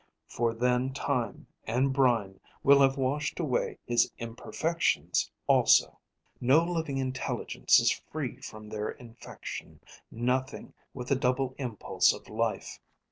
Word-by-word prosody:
For 115 -1 -1
then 125 +2 +1
time 130 -5 -2 0.2
and 130 +4 +1
brine 115 -8 +1 0.2
will 140 0 +6
have 135 0 +4
washed 140 +2 -1
away 145 -7 -1
his 120 0 +2
imperfections 160 +8 -1 0.2
also. - - +4 0.4
"No 135 +6 +4
living 165 -5 -2
intelligence 130 0 +1
is - - +3 0.2
free - - -4
from 110 0 -9
their 105 0 -3
infection, 115 -2 -9 0.3
nothing 125 +3 -2 0.2
with 125 -2 -6
the 140 - +4
double 130 0 0
impulse 120 -6 +1
of - - -11
life. 115 0 -2
130 Hz, 125 wpm, -29 LUFS, 115-135 Hz, 0.4 s, will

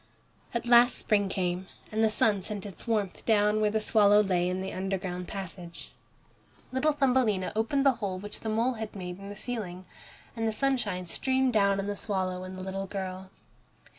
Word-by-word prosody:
At 235 0 -2
last 240 +1 +6
spring 205 -2 +2
came, 180 0 -2 0.2
and 220 +1 +1
the 220 - +5
sun 210 -2 +2
sent 205 +1 -5
its 200 +3 -8
warmth 210 -5 -1
down 210 -1 +3
where 210 - +3
the 220 +1 0
swallow 210 -1 +5
lay 180 -3 +1
in 185 +1 -2
the 190 - -4
underground 185 -1 -3
passage. 180 -3 -7 0.8
Little 260 +4 +2
Thumbelina 250 -9 +2
opened 270 +6 +1
the 275 - +7
hole 190 -3 -2
which 205 +2 -7
the 220 - -4
mole 230 +4 +1
had 220 -2 -6
made 180 -1 -6
in 200 0 -8
the 205 - -7
ceiling, 205 -5 -5 0.5
and 225 -1 -1
the - - +1
sunshine 215 -7 0
streamed 260 +8 +1
down 200 -2 +3
on 195 - -2
the 205 0 -2
swallow 185 -3 -2
and 185 0 -7
the 185 - -6
little 195 +1 -4
girl. 190 -1 -5
205 Hz, 190 wpm, -29 LUFS, 185-225 Hz, 0.8 s, the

